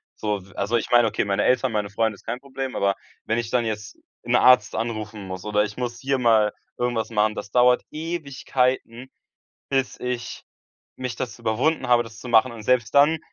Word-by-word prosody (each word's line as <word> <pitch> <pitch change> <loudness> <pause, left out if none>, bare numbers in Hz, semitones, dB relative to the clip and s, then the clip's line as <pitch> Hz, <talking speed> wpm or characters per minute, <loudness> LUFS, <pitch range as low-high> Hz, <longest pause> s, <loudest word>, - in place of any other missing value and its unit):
So 105 -2 -2
v 95 0 -18
also 100 +4 -1
ich - - -4
meine, 120 -2 +6
okay, 105 - -1
meine 100 -1 0
Eltern, 130 -1 +2
meine 105 -2 -1
Freunde, 110 +1 0
ist - - -19
kein 125 - -3
Problem, 135 -1 -5
aber 100 0 +1 0.3
wenn 115 - 0
ich 115 -1 -4
dann 125 -2 +1
jetzt 105 -2 -5 0.3
'n - - +1
Arzt 125 -5 +5
anrufen 110 -3 -4
muss 95 -1 -7
oder 105 0 +2
ich 105 0 -5
muss 120 -1 -4
hier 135 0 0
mal 110 -3 +3 0.2
irgendwas 120 -2 -1
machen, 110 -1 +1
das 105 - -6
dauert 125 +1 +4
Ewigkeiten, 135 -6 -2 0.6
bis 135 -2 -1
ich 125 -1 -4 0.5
mich 125 -2 -4
dazu 120 -2 -6
überwunden 125 +9 +1
habe, 120 -1 +5
das 115 -1 -12
zu 125 - -8
machen. 120 +2 +4
Und 115 -2 -9
selbst 120 -2 +1
dann 150 +3 +5
120 Hz, 200 wpm, -24 LUFS, 105-125 Hz, 0.6 s, meine